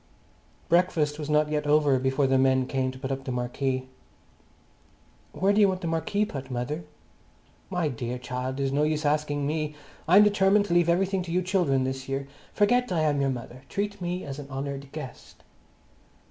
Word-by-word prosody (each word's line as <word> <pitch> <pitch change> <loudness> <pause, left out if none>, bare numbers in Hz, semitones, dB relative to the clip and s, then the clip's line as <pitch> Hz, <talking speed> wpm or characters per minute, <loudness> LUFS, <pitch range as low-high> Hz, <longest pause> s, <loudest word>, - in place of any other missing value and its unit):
Breakfast 160 -4 +2
was 150 -1 -5
not 150 0 +3
yet 150 -1 -1
over 145 -3 +4
before 130 +2 +1
the 135 0 +3
men 130 -1 +3
came 130 0 -1
to 130 - -8
put 130 0 -4
up 135 0 -3
the 130 - -4
marquee. 130 +1 -2 1.4
"Where 195 +2 +2
do 210 - +4
you 200 - +7
want 185 -1 -2
the 170 - -3
marquee 165 +6 0
put, 135 -8 -7
mother?" 130 +6 -3 0.8
"My 180 -4 0
dear 125 -2 -4
child, 125 +2 -4
it's 135 -1 0
no 140 +2 +1
use 155 0 0
asking 145 -1 0
me. 150 0 -2 0.3
I'm 190 +5 +8
determined 205 0 +4
to 180 - -2
leave 175 -1 +4
everything 190 +2 +2
to 175 -2 -6
you 180 +2 +1
children 175 -8 +1
this 130 0 -4
year. 135 0 -2 0.2
Forget 245 +4 +2
I 170 -3 +1
am 145 -2 +2
your 135 - +2
mother. 125 0 -6
Treat 205 0 -3
me 175 +1 -3
as 140 0 -6
an 140 -1 -9
honoured 140 0 -5
guest." 150 -5 -9
150 Hz, 190 wpm, -27 LUFS, 135-175 Hz, 1.4 s, I'm